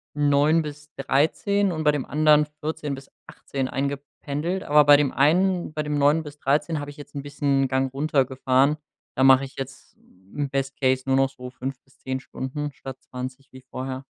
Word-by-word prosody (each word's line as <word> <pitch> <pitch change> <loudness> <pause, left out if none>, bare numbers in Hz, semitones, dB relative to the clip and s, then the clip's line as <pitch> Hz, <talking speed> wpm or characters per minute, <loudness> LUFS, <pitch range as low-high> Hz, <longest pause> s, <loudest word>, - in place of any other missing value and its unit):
9:00 145 +2 +3
bis 150 0 -9
13:00 170 +9 +1
und 155 -1 -3
bei 150 - +5
dem 145 -3 -3
anderen 150 0 +4
14:00 150 -2 -3
bis 135 +1 -13 0.2
18:00 135 -2 -4
eingependelt. 140 +6 -3
Aber 150 +1 +5
bei 145 0 +8
dem 145 -2 +1
einen 175 +5 +2
bei 155 0 -2
dem 150 -1 -1
9:00 150 +3 +3
bis 150 -1 -11
13:00 150 +3 +1
hab 145 - -6
ich 145 - -12
jetzt 145 - -12
'n 140 - -4
bisschen 145 -1 0
'n - - 0
Gang 130 0 0
runtergefahren. 135 0 +2 0.4
Da 130 - +1
mach 130 0 +7
ich 135 -1 -8
jetzt 135 0 -8
im 100 +10 -7
Best 135 0 -2
Case 130 0 +2
nur 135 0 +2
noch 135 0 +3
so 125 -2 -10
5 130 +1 -6
bis 135 +1 -29
10 130 0 -3
Stunden 145 +3 -5
statt 135 -1 -9
20 130 +2 -8
wie 130 - -12
vorher. 130 +1 -6
140 Hz, 195 wpm, -24 LUFS, 130-150 Hz, 0.4 s, bei